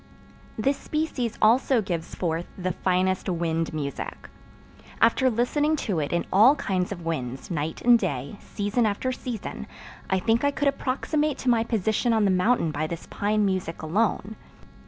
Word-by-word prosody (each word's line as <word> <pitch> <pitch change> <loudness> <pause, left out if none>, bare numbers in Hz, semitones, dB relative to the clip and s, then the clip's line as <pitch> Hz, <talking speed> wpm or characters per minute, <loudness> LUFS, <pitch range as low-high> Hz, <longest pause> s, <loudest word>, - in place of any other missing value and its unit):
This 270 +6 +1
species 305 -7 -2
also 245 +3 +4
gives 175 -6 -4
forth 170 -1 -2
the 185 -1 -1
finest 185 +2 0
wind 165 -2 -1
music. 145 -3 -5 0.7
After 245 +3 +4
listening 290 +7 +1
to 190 -7 0
it 145 - -2
in 170 - 0
all 225 +9 +7
kinds 185 -9 -1
of 175 -4 -6
winds, 130 -3 -4
night 160 -1 -3
and 240 -1 +6
day, 145 - -3
season 210 +3 -1
after 215 +5 -1
season, 250 -3 -6 0.4
I 190 - +2
think 225 +6 +1
I 285 - +4
could 285 0 -1
approximate 285 +2 0
to 260 - -1
my 230 -2 +3
position 225 +1 0
on 220 -2 +3
the 195 - +3
mountain 185 -2 +2
by 155 +1 -2
this 170 0 -6
pine 210 +1 +1
music 185 -5 -2
alone. 205 +4 0
205 Hz, 160 wpm, -25 LUFS, 170-240 Hz, 0.7 s, all